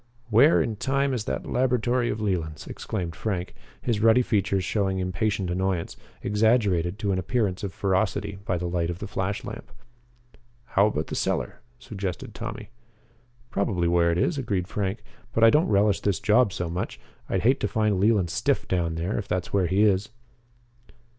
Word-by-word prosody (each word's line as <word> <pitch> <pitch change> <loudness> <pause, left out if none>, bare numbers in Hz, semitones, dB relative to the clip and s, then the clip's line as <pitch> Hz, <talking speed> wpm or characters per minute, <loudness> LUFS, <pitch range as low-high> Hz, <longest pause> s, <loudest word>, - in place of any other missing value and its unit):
"Where 135 +9 +6
in 110 -2 -3
time 140 +3 0
is 115 -4 -2
that - - -3
laboratory 125 -1 +1
of 105 - -2
Leland's?" 85 -7 -2
exclaimed 85 -3 -5
Frank, 90 -1 -3 0.3
his 115 -4 0
ruddy 115 +3 +5
features 100 -4 +1
showing 95 +1 0
impatient 95 +1 -1
annoyance, 95 -1 -1 0.3
exaggerated 105 -5 +2
to 105 -2 -1
an 95 - 0
appearance 100 0 -1
of 100 - -3
ferocity 95 0 -1
by 90 -3 -1
the 90 - -4
light 85 -1 -1
of 85 - -3
the - - -6
flashlamp. 100 +3 -4 1.0
"How 100 +2 +5
about 80 -7 -1
the - - -5
cellar?" - - -2 0.2
suggested 100 -8 -5
Tommy. 105 +1 -7 0.8
"Probably 95 -4 0
where 85 0 +3
it 85 - 0
is," 145 - +1
agreed 100 -8 -1
Frank, 105 +1 -3 0.3
"but 115 - +2
I 115 - +8
don't 150 +3 +3
relish 100 -1 +3
this 100 -3 0
job 110 0 +3
so 90 -2 -3
much. 85 +2 -4 0.3
I'd - - 0
hate 130 +4 +4
to - - 0
find 110 -4 +1
Leland 100 -4 +3
stiff - - 0
down 85 -3 0
there, 85 +5 -2
if 100 - -6
that's 90 -1 -2
where 95 -3 +3
he 95 +4 +3
is." 105 0 +2
100 Hz, 175 wpm, -26 LUFS, 90-110 Hz, 1.0 s, I